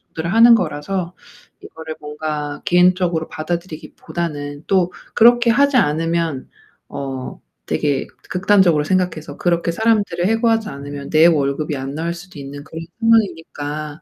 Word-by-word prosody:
들을 170 +4 -2
하는 230 +1 +8
거라서 175 +1 -3 0.5
이거를 160 -1 -9
뭔가 150 -1 -5
개인적으로 180 -2 +2
받아들이기 165 -1 -5
보다는 145 -3 -5
또 180 -2 +2 0.2
그렇게 240 +1 +5
하지 280 +3 +4
않으면 165 - 0 0.4
어 135 -2 -6 0.3
되게 135 - -1 0.2
극단적으로 185 -5 +3
생각해서 165 -4 -2
그렇게 170 -1 0
사람들을 205 -4 +1
해고하지 225 0 +1
않으면 140 0 -8
내 155 +1 +5
월급이 145 -1 0
안 135 +1 -5
나올 170 +2 -2
수도 175 -1 -12
있는 140 +1 -8
그런 165 +1 -8
상황이니까 160 -9 0
165 Hz, 335 characters per minute, -19 LUFS, 150-185 Hz, 0.5 s, 하는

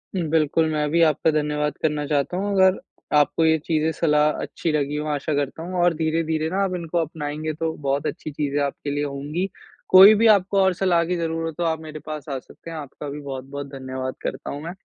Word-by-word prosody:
बिल्कुल, 160 -2 +2
मैं 150 -1 0
भी 170 +1 +3
आपका 155 +1 +2
धन्यवाद 150 -1 -1
करना 150 -1 0
चाहता 145 +4 0
हूँ। 200 +2 -1
अगर 190 -1 +4 0.4
आपको 150 +2 +3
ये 160 0 +4
चीज़े 160 0 +1
सलाह 150 -2 +3
अच्छी 165 - -3
लगी 145 -1 -1
हों 150 +1 -3
आशा 145 +2 -2
करता 145 +3 -2
हूँ 180 +2 -6
और 175 -1 +4
धीरे-धीरे 160 0 0
ना 195 +3 0
आप 185 -2 -1
इनको 170 -1 -3
अपनाएँगे 155 -1 -3
तो 160 +1 -2 0.2
बहुत 140 +2 0
अच्छी 155 +1 -5
चीज़े 145 -1 -2
आपके 140 0 -3
लिए 145 +1 -1
होंगी। 145 +6 -3 0.4
कोई 195 +3 +10
भी 225 +2 +4
आपको 195 +1 -1
और 190 -1 +3
सलाह 180 -2 +2
की 180 +2 -1
ज़रूरत 165 -1 -2
हो 175 - 0
आप 160 -1 0
मेरे 155 -1 -8
पास 155 0 -7
आ 135 -2 -2
सकते 165 - -14
हैं। 165 - -6
आपका 145 0 -7
भी 145 +1 -6
बहुत-बहुत 140 0 -6
धन्यवाद 130 -1 -5
करता - - -4
हूँ 145 - -6
मैं। 170 +2 -5
155 Hz, 215 wpm, -23 LUFS, 145-165 Hz, 0.4 s, कोई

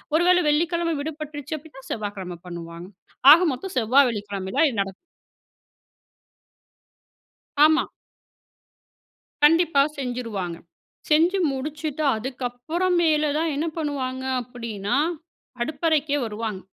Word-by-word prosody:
1 330 - +4
வேளை 360 0 +5
வெள்ளிக்கிழமை 335 +2 +1
விடுபட்டுருச்சு 305 0 -5
அப்டின்னா 295 -2 -14
செவ்வாய்க்கிழம 200 -5 -5
பண்ணுவாங்க. 170 0 -8 0.5
ஆக 335 - +5
மொத்தம் 365 +8 -7
செவ்வாய் 255 +4 +4
வெள்ளிக்கிழமையில 205 +2 -1
இது 225 -5 -4
நடக்கும். 195 -1 -4 2.7
ஆமா. 315 +1 +4 1.6
கண்டிப்பா 325 -2 +5 0.2
செஞ்சுருவாங்க. 230 -9 -4 0.5
செஞ்சு 335 +6 +4
முடிச்சுட்டு 300 +2 -4
அதுக்கப்புறம் 260 +9 -2
மேல 305 -2 +2
தான் 325 +1 0
என்ன 305 +3 -1
பண்ணுவாங்க, 265 -4 -3 0.2
அப்டின்னா, 230 -5 -4 0.7
அடுப்பறைக்கே 305 0 0
வருவாங்க. 215 -2 -4
275 Hz, 95 wpm, -24 LUFS, 220-315 Hz, 2.7 s, வேளை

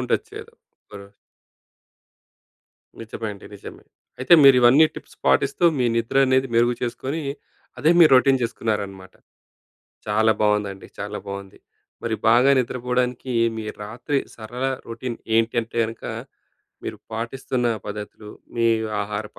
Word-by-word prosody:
ఉండొచ్చు. - - -2
ఏదో - - -19 0.3
ఒక - - -17
రోజు. 100 0 -17 1.9
నిజమే 115 0 -6
అండి. 100 - -13
నిజమే. 100 - -11 0.3
అయితే 130 +7 +5
మీరు 135 -2 +8
ఇవన్నీ 125 +6 +7
టిప్స్ - - -12
పాటిస్తూ 140 +6 +2
మీ 125 - +1
నిద్ర 115 +3 -1
అనేది 130 0 +2
మెరుగు 120 +1 +3
చేసుకొని, 135 +6 -3 0.6
అదే 155 - +3
మీ 170 - +9
రొటీన్ 130 0 +4
చేసుకున్నారనమాట. 105 -5 -3 0.9
చాలా 110 +1 +3
బాగుందండి. 105 -2 0
చాలా 105 +1 -5
బాగుంది. 100 -1 -8 0.4
మరి 115 -1 -1
బాగా 120 +4 +5
నిద్రపోవడానికి 125 0 -2 0.2
మీ 110 - -5 0.2
రాత్రి 120 +7 -2 0.2
సరళ 120 +3 -6 0.2
రొటీన్ 115 +1 -5 0.2
ఏంటంటే 115 0 0
అనక 115 +1 -10 0.8
మీరు - - -5
పాటిస్తున్న 120 +2 -2 0.2
పద్ధతులు, 105 0 -8 0.3
మీ 115 0 +2 0.4
ఆహారపు 105 +1 -6
115 Hz, 120 wpm, -22 LUFS, 105-125 Hz, 1.9 s, మీ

